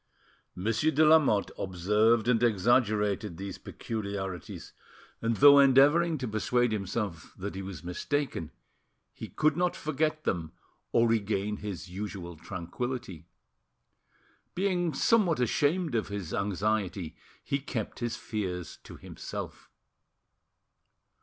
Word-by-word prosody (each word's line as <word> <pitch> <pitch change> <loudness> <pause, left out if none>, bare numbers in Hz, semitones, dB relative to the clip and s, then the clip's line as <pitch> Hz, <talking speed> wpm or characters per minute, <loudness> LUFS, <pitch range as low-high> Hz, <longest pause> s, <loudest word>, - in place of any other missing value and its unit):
Monsieur 115 +10 +1
de 155 0 +4
Lamotte 150 -10 +4
observed 105 +5 +2
and 120 -2 +3
exaggerated 105 -4 +2
these 100 +1 -6
peculiarities, 100 -5 -6 0.5
and 115 -1 0
though 145 0 +8
endeavouring 145 +5 +5
to 130 -2 -4
persuade 120 +2 +1
himself 100 -4 -4
that 100 +2 -5
he 95 - -5
was 95 -4 -8
mistaken, 90 - -2 0.6
he - - -8
could 155 -1 +1
not 180 +1 +1
forget 155 +1 -1
them, 80 -4 -2 0.4
or 115 0 +4
regain 105 -2 0
his 100 -4 -6
usual 90 -2 -6
tranquility. 90 +1 -6 1.3
Being 180 -3 +1
somewhat 190 - +2
ashamed 145 +6 +1
of 115 -2 0
his 100 -5 -5
anxiety, 100 -3 -1 0.3
he 140 - -1
kept 125 -5 -5
his 120 -1 -2
fears 90 -5 -4
to - - -10
himself. - - -8
110 Hz, 115 wpm, -29 LUFS, 95-140 Hz, 1.3 s, though